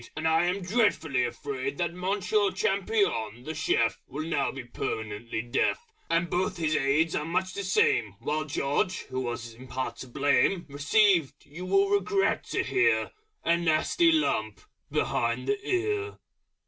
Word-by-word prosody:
And 155 +1 -1
I 160 +1 +3
am 185 +2 -1
dreadfully 175 - +1
afraid 135 +2 -4
That 170 -1 -1
Monsieur 200 +3 +1
Champignon, 185 - 0
the 155 - -4
Chef, 120 -7 +1
Will 145 +4 -5
now 145 -4 0
be 135 -2 -7
permanently 115 -1 -4
deaf 120 - 0 0.2
And 165 +1 +2
both 180 +2 -1
his 155 -2 0
Aides 150 +4 +2
are 150 - 0
much 185 +3 -1
the 200 - -4
same; 110 - +2
While 150 +5 -2
George, 145 +5 -1
who 130 - -2
was 120 -2 -4
in 130 +3 -13
part 130 +1 -4
to 130 - -8
blame, 140 +7 +2
Received, 160 +3 +2
you 170 +5 -8
will 395 - +3
regret 405 -1 +1
to - - -1
hear, 390 +4 +2 0.3
A 170 - +4
nasty 170 - +3
lump 110 - 0 0.3
behind 120 +2 0
the 205 0 -1
ear. 415 +3 -1
160 Hz, 155 wpm, -28 LUFS, 130-195 Hz, 0.3 s, A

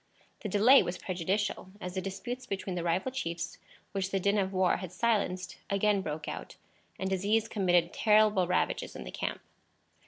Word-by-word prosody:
The 210 - -4
delay 220 +8 +7
was 175 - -3
prejudicial, 190 +2 -2
as 180 -3 -5
the 190 - -2
disputes 245 +7 -5
between 195 -1 -3
the 175 - -2
rival 175 +9 0
chiefs, 170 -10 -4 0.3
which 195 -1 -1
the 195 - 0
din 200 +2 +2
of 190 -1 0
war 185 -1 +2
had 185 -2 -7
silenced, 185 -3 0
again 200 0 +2
broke 155 -3 -5
out, - - -6 0.4
and 190 - -2
disease 200 +4 +1
committed 175 -4 +2
terrible 210 -4 +4
ravages 180 - 0
in 65 - -6
the - - -7
camp. - - -3
190 Hz, 175 wpm, -30 LUFS, 180-210 Hz, 0.4 s, delay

